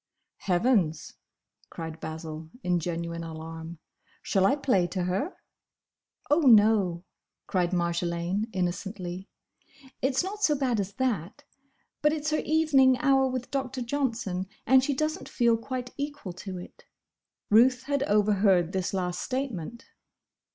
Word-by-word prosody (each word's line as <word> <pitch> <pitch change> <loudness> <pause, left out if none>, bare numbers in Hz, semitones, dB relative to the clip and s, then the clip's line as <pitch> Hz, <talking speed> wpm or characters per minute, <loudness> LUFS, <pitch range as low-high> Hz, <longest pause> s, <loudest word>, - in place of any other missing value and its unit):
"Heavens!" 180 -4 +1 0.6
cried 160 -1 -7
Basil 160 0 -7
in 180 -1 +1
genuine 170 0 -4
alarm, 165 +1 -7 0.5
"Shall 195 -1 +3
I 275 - +3
play 250 -11 +2
to 180 0 -3
her?" 190 - -2 1.0
"Oh, 295 - +5
no!" 210 - +5 0.4
cried 180 -2 0
Marjolaine, 170 +3 -1
innocently, 185 0 -4 0.7
"it's 265 +2 +1
not 410 +3 -5
so 300 -6 +3
bad 255 -5 0
as 200 0 -3
that. 220 - -2 0.6
But 300 0 +3
it's 305 -1 -2
her 305 - +1
evening 285 -5 +4
hour 270 0 +3
with 255 -1 -4
Doctor 265 -2 -2
Johnson, 230 -8 -2 0.2
and 260 +2 +5
she 280 0 0
does 310 +5 -1
n't - - -10
feel 235 -2 +3
quite 250 +2 -5
equal 285 -9 -5
to 185 +1 -7
it." 180 - -12 0.7
Ruth 250 +4 +5
had 280 0 -1
overheard 200 - +3
this 190 +1 -2
last 180 -1 -2
statement. 235 - -4
205 Hz, 130 wpm, -27 LUFS, 175-265 Hz, 1.0 s, Oh